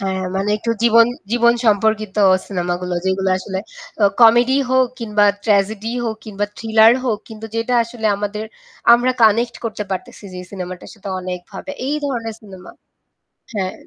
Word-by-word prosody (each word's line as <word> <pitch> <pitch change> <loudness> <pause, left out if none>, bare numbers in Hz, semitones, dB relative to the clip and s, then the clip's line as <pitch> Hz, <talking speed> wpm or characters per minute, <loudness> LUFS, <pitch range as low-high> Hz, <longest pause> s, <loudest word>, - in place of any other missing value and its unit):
হ্যাঁ, 190 -1 -2
মানে 195 +2 -1
একটু 230 - -2
জীবন 230 0 +6 0.3
জীবন 235 0 +4
সম্পর্কিত 215 -1 +1 0.3
সিনেমাগুলো 180 -1 -3
যেগুলো 190 0 0
আসলে 190 0 -5 0.4
আ - - +7 0.2
comedy 240 +3 +6
হোক 260 0 +4
কিংবা 210 -2 +2 0.2
tragedy 215 +1 +1
হোক 220 -2 -2
কিংবা 205 -1 -2
thriller 220 0 +5
হোক 225 -5 0
কিন্তু 220 0 -8
যেটা 230 +2 -1
আসলে 230 -1 -4
আমাদের 210 +1 -4 0.5
আমরা 250 +2 +1
connect 230 +2 +3
করতে 215 -2 -3
পারতেছি 190 +2 -6
যে - - -6
সিনেমাটার 185 -2 -7
সাথে 200 -2 -10
অনেকভাবে 185 +6 -7 0.2
এই 295 - 0
ধরনের 235 -5 -3
সিনেমা 190 -3 -12 0.8
হ্যাঁ। 190 -4 -2
215 Hz, 145 wpm, -19 LUFS, 195-230 Hz, 0.8 s, আ